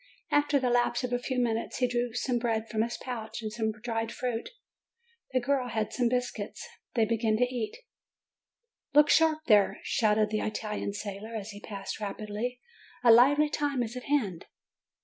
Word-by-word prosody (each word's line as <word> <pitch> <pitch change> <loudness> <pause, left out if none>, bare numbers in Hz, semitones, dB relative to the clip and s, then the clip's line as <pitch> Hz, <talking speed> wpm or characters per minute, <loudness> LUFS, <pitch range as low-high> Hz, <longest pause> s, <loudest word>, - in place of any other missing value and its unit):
After 290 -1 +3
the 250 -2 +1
lapse 240 0 +2
of 250 0 -2
a 245 - +1
few 255 +1 -3
minutes, 230 -2 0
he 250 - +2
drew 245 0 -1
some 245 0 0
bread 225 -2 -1
from 220 0 -1
his 235 +1 -1
pouch, 235 -2 -6
and 215 - -3
some 220 -1 0
dried 225 +1 -3
fruit; 245 -2 -3 0.8
the 255 - +2
girl 260 0 0
had 220 -3 -2
some 245 -2 +2
biscuits: 250 0 -3 0.3
they 225 -2 +4
began 220 0 +1
to 250 - +3
eat. 245 - -2 1.2
"Look 295 0 +7
sharp 320 -1 +4
there!" 205 -3 +4
shouted 215 -1 +2
the 215 - 0
Italian 210 -1 -3
sailor, 210 +2 -6
as 215 0 -5
he 205 - -9
passed 200 -1 -6
rapidly; 215 +4 -4 0.4
"a 235 - +8
lively 280 +6 +6
time 290 -4 0
is 235 +1 -6
at 250 - -6
hand!" 225 - 0
235 Hz, 175 wpm, -29 LUFS, 215-250 Hz, 1.2 s, a